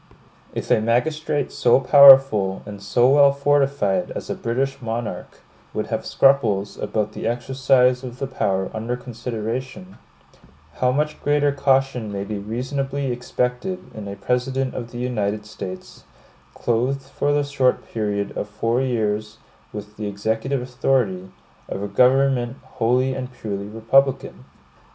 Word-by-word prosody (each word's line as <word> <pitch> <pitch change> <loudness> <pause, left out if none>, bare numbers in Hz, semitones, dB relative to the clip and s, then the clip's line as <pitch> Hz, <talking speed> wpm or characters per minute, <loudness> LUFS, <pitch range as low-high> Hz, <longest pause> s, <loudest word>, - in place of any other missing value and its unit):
If - - -4
a - - +4
magistrate 145 +5 0
so 120 +2 +3
powerful 135 -8 +7
and 100 -1 -9
so 120 +5 +2
well 140 +1 +6
fortified 140 -9 +1
as - - -5
a - - 0
British 135 +4 -2
monarch, 115 0 -5 0.3
would - - -3
have - - -3
scruples 110 -8 +2
about 105 -1 -2
the - - -5
exercise 125 +1 +2
of 125 -1 -7
the 135 - -3
power 95 -7 -1
under 115 +3 -3
consideration, 125 - -6 0.8
how 125 0 +2
much 150 +3 -1
greater 145 0 +2
caution 135 -5 +1
may 100 -1 -3
be 105 0 -5
reasonably 135 +5 -3
expected 125 +8 -3
in 105 -2 -8
a 100 - -6
President 125 +5 -1
of 120 -2 -6
the 120 - -9
United 105 -4 -2
States, 95 -3 -9 0.5
clothed 125 +4 -1
for 140 +1 -2
the 145 0 +2
short 140 -3 0
period 105 -2 -2
of 105 - -4
four 115 +4 0
years 110 -4 -2 0.3
with 105 0 -9
the 105 -1 -4
executive 110 +6 -2
authority 125 -7 -1 0.4
of 95 - -4
a - - -2
government 125 +3 +2
wholly 130 +1 0
and 130 -1 -5
purely 100 -4 -5
republican? 120 +6 +1
125 Hz, 140 wpm, -22 LUFS, 105-135 Hz, 0.8 s, powerful